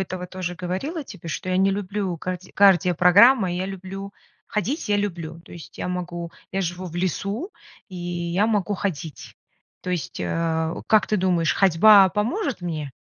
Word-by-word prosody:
этого 185 -1 -4
тоже 180 -1 -5
говорила 270 - -4
тебе, 170 -7 -10
что 185 - -4
я 185 - +1
не 195 +1 +3
люблю 195 -2 -2
карди 185 +2 -6
кардиопрограммы, 195 - +5
я 185 +1 -2
люблю 195 +1 -7 0.3
ходить 230 - -2
я 205 - +3
люблю. 170 -5 -4
То - - -15
есть 170 - -12
я - - -3
могу, 175 -2 -4 0.2
я 195 - -1
живу 180 +1 -3
в 170 - -8
лесу, 200 - -2 0.4
и 190 - -12
я 175 +2 -1
могу 205 -2 0
ходить. 165 -6 -5 0.5
То 180 - -4
есть, 175 -4 -3
а, 160 -1 -1
как 215 -1 +4
ты 215 - +1
думаешь, 180 -4 +1
ходьба 195 +2 +6
поможет 235 - -2
мне? 155 -5 -4
185 Hz, 165 wpm, -23 LUFS, 175-200 Hz, 0.5 s, ходьба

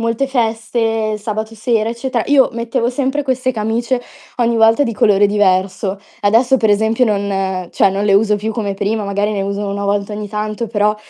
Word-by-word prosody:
molte 230 +4 0
feste, 225 -3 -1
sabato 220 +1 -4
sera, 225 0 0
eccetera. 235 0 -2
Io 280 -2 +5
mettevo 235 +1 -1
sempre 270 +3 -1
queste 255 -1 -1
camicie 235 +3 -1 0.4
ogni 235 -1 +1
volta 225 +4 +4
di 230 -5 -2
colore 205 -1 +4
diverso. 195 -1 0 0.2
Adesso 235 +6 +3
per 220 -4 +1
esempio 220 +4 +2
non 195 -3 -1
cioè, 195 - +3
non 200 +2 -2
le 200 - +4
uso 210 +1 +3
più 215 +2 -3
come 210 -3 -2
prima, 205 +2 -2
magari 200 +1 -1
ne 200 -2 -2
uso 200 +1 -3
una 200 0 -3
volta 200 +1 -1
ogni 210 0 -5
tanto, 215 +2 -3
però, 210 -1 +1
220 Hz, 185 wpm, -17 LUFS, 205-235 Hz, 0.4 s, Io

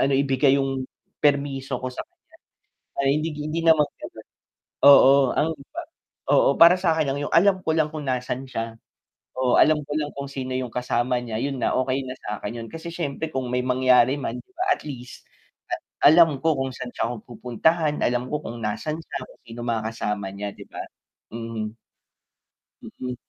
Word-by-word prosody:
ano 140 - +2
ibigay 135 0 +3
yung 135 -1 -1 0.4
permiso 140 -3 +1
ko - - -2
sa 125 - -6
kanya, 355 +1 -48 0.8
ay 135 - +2
hindi 160 +2 -2
hindi 155 +2 -3
naman 160 -2 +6 0.2
ganon, - - -10 0.6
oo 140 -1 +9 0.2
ang 160 - +2 0.8
oo - - +5
para 170 +2 +9
sakin 160 -4 +2
lang 140 - -3
yung - - -4
alam 190 +2 +5
ko 160 - 0
lang 155 -2 +2
kung 155 -2 -5
nasaan 130 0 -2
siya 115 -2 -4 0.6
oo 130 -1 +2
alam 155 0 +5
ko 145 - -7
lang 150 -1 -2
kung 140 0 -4
sino 130 -2 -5
yung 130 -1 -2
kasama 125 0 0
niya 115 -3 -4
yun 140 -1 -2
na, - - +1
okey 130 +1 0
na 130 - -5
sakin 105 +2 -5
yun, - - -7
kasi 165 +1 -7
siyempre 160 -2 -3
kung 130 -1 -2
may 125 0 +1
mangyari 130 +1 +4
man 115 - -3
di - - -14
ba 365 +2 -2
at - - -13
least, 125 -4 -8 0.8
alam 160 -1 +7
ko 160 -1 +3
kung 135 0 -1
saan 125 -1 -6
siya - - -1 0.2
pupuntahan, 145 +7 0
alam 120 +1 0
ko 150 - -1
kung 120 +1 -6
nasan 150 +9 -3
siya, - - -6
kung - - -20
sino 115 +1 -9
mga 115 -2 0
kasama 105 -3 -3
niya 100 +1 -4
di - - -11
ba? - - -6 0.5
Mhm. 115 -1 -5 1.1
Mhm. 125 -1 -7
135 Hz, 180 wpm, -24 LUFS, 125-150 Hz, 1.1 s, oo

